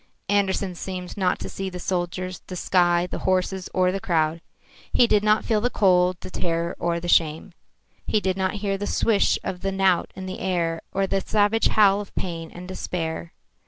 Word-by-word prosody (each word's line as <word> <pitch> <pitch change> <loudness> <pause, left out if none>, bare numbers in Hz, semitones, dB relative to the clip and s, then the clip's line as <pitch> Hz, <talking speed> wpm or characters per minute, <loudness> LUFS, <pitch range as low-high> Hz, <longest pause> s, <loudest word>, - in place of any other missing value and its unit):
Andersen 195 -2 +1
seemed 180 0 -6
not 185 -3 +1
to - - -6
see 195 0 -4
the 180 - -7
soldiers, 185 0 -3
the 185 - -6
sky, 175 -1 +2
the 180 - -5
horses 185 0 0
or 185 0 +2
the 195 - -2
crowd. 165 -3 0 0.5
He 245 - +5
did 210 -3 +3
not 215 0 +3
feel 220 -3 +1
the 245 - +1
cold, 180 -5 +3
the - - -8
terror 170 -1 -2
or 170 0 0
the 175 - -6
shame. 165 +2 +2 0.5
He 215 - +2
did 190 -2 -1
not 190 +1 -1
hear 195 -1 0
the 205 - -3
swish 215 -3 +2
of 180 -1 -4
the 195 - -1
knout 190 -2 +2
in 190 0 -7
the 185 0 -6
air 170 -3 -1
or 195 0 +1
the 195 0 0
savage 210 +2 +2
howl 205 -1 +4
of 205 - -12
pain 165 -3 -4
and 180 +1 -10
despair. 170 -3 -4
185 Hz, 195 wpm, -24 LUFS, 175-195 Hz, 0.5 s, He